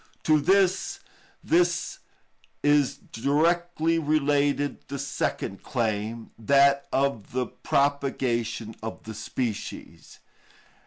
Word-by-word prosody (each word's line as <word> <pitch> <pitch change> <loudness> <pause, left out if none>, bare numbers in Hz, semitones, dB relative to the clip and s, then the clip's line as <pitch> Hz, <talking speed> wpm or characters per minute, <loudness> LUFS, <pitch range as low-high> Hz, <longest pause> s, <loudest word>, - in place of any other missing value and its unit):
To 155 -1 +4
this 190 - +2 1.6
is 145 -2 +3 0.2
directly 165 +5 +1
related 145 -2 +1
the 140 - -5
second 130 -7 -3
claim, 110 -2 -2
that 140 +4 +4
of 135 -6 -1
the 125 0 0
propagation 125 -7 -1
of 110 0 -6
the 110 - -7
species. 110 +1 -5
140 Hz, 85 wpm, -26 LUFS, 115-150 Hz, 1.6 s, To